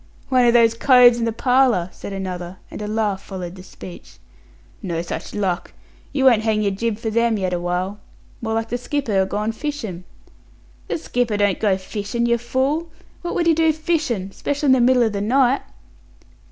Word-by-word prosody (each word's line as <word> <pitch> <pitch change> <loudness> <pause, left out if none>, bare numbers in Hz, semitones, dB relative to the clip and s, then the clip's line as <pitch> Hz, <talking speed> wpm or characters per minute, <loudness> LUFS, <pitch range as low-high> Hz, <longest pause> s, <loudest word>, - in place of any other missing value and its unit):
"One 255 -2 +4
of 235 - +4
those 230 -1 +5
coves 245 0 +6
in 230 - 0
the 230 - 0
parlour!" 245 -6 +2
said - - -9
another; 185 -2 -5
and - - -7
a 210 - -4
laugh 210 -2 -1
followed 180 -3 -7
the 185 - -11
speech. 185 -1 -12 0.6
"No 170 -5 -3
such 175 - -6
luck. 190 -4 -2 0.4
You 270 -2 0
won't 235 -5 +6
hang 215 -1 +1
your 200 - +1
jib 215 +2 -2
for 225 0 -3
them 230 0 +2
yet 185 -2 -1
awhile. 180 +3 -2 0.4
More 220 -1 -2
like 225 0 -2
the 245 - -2
skipper 245 -7 0
agone 210 +3 -1
fishin'." 225 - -5 0.8
"The - - -1
skipper 245 -8 -1
don't 205 -2 +1
go 200 -3 +2
fishin', 205 +4 -3
yer 235 0 +2
fool. 270 +7 -1 0.3
What 345 - -4
would 345 - +1
he 335 - +5
do 320 0 +3
fishin'? 305 - -1
special 285 +8 -3
in 270 - +5
the 260 -1 +5
middle 250 0 +4
o' 225 - +2
the 200 -2 -3
night." 260 +4 +3
225 Hz, 190 wpm, -21 LUFS, 195-255 Hz, 0.8 s, coves